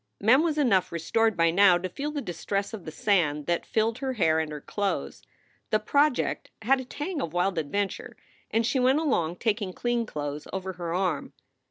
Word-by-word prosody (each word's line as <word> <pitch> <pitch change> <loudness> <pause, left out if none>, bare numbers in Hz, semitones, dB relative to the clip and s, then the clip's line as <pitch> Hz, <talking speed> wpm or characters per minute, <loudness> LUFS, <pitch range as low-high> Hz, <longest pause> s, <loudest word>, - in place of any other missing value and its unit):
Mem 245 +7 +5
was 320 -2 0
enough 225 -11 +2
restored 210 +6 +1
by 165 0 +4
now 185 0 +6
to 180 +1 -3
feel 280 +11 -4
the 295 -2 -4
distress 195 +4 -3
of 205 -6 -7
the 155 - -6
sand 155 -6 +1
that 170 0 -1
filled 225 0 0
her 265 -1 -2
hair 160 -8 +2
and 160 -1 -2
her 150 - -5
clothes. 200 +6 -3 0.5
The 215 - +2
project 285 +5 +1
had 265 +4 +3
a - - -9
tang 295 +4 -4
of 160 - -4
wild 180 0 +1
adventure, 195 +6 -3 0.3
and 225 +1 +1
she 250 +3 +1
went 255 +3 +4
along, 215 - 0
taking 205 -2 -1
clean 240 +1 -1
clothes 145 -2 -5
over 190 0 -4
her 175 -1 -5
arm. 180 +1 -1
200 Hz, 195 wpm, -27 LUFS, 170-245 Hz, 0.5 s, now